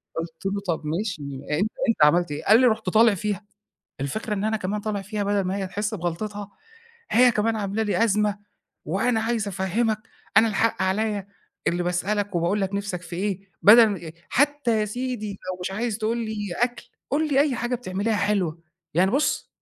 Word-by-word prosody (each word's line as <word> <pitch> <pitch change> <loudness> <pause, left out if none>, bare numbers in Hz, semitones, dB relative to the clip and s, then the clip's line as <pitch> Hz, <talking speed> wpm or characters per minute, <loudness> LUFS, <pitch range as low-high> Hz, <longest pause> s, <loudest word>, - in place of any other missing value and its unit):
قُلت 165 +1 -6
له 200 +1 -1
طَب 165 -3 -1
ماشي 165 +1 -2 0.3
أ - - +1
أنت 215 +3 +1 0.2
أنت 220 -9 +3
عملت 170 +3 +4
إيه؟ 145 - -4
قال 220 +3 +7
لي: 255 - +6
"رُحت 220 -4 0
طالع 220 +3 +5
فيها، 205 +1 -3 0.6
الفكرة 210 - -2
إن 200 0 -2
أنا 220 0 +1
كمان 205 +1 -3
طالع 205 -1 -3
فيها 205 +1 -3
بَدل 200 0 +1
ما 185 +2 -1
هي 195 -1 -2
تحسّ 205 +3 -3
بغلطتها 205 +3 -4 0.6
هي 245 +1 +6
كمان 225 +1 +1
عاملة 205 +1 -1
لي 220 +1 +2
أزمة، 210 -1 +1 0.5
وأنا 220 +8 +1
عايز 225 -2 -1
أفهّمك 205 +4 0 0.4
أنا 225 +1 +7
الحق 220 -1 +1
عليَّ 200 +1 0 0.4
اللي 175 +1 +1
باسألك 195 +3 -1
وباقول 175 +5 +1
لك 195 0 -1
نِفْسك 200 -3 -3
في 175 -1 -7
إيه؟ 195 0 -1 0.2
بَدل 225 +2 +9
م 170 -5 -5 0.2
حتى 280 -5 +2
يا - - +1
سيدي 240 0 -3
لو 185 -2 -7
مش 180 - -3
عايز 220 +2 -2
تقول 225 +1 0
لي 215 -4 -3
أكل، 245 -1 -1 0.2
قُل 305 +3 +1
لي 275 -2 +3
أي 285 -3 +2
حاجة 240 +2 -1
بتعمليها 215 -2 -1
حلوة، 195 -5 0 0.4
يعني 185 +4 +4
بُصّ 280 +6 0
205 Hz, 190 wpm, -24 LUFS, 190-225 Hz, 0.6 s, بَدل